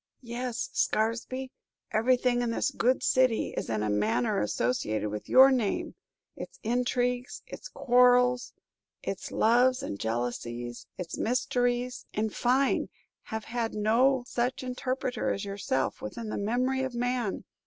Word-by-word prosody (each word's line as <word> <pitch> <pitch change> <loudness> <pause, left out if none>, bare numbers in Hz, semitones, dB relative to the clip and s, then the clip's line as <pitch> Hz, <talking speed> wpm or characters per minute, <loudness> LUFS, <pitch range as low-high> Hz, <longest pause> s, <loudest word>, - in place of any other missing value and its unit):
"Yes, 240 0 -4
Scaresby, 240 +4 -1 0.4
everything 245 +2 +2
in 240 - 0
this 230 - 0
good 255 +2 +1
city 255 -3 +2
is - - -3
in 110 -1 -1
a 105 - 0
manner 110 +4 +1
associated 110 -1 -1
with 105 0 -6
your 265 +1 +8
name. 235 -7 0 0.4
Its - - -8
intrigues, 245 +1 -1
its - - -9
quarrels, 250 - +4 0.5
its - - -4
loves 250 +3 +3
and 100 - -5
jealousies, 120 +1 -3
its 180 -2 -5
mysteries, 245 0 0
in 215 +1 -1
fine, 260 +5 +1 0.4
have 220 0 -4
had 230 -1 -3
no 245 +5 +3
such 250 +1 -2
interpreter 255 0 -2
as 200 - -3
yourself 195 -9 -2
within 220 - -6
the - - -3
memory 250 +5 0
of 260 -2 -3
man! 245 -3 -1
240 Hz, 130 wpm, -28 LUFS, 200-250 Hz, 0.5 s, your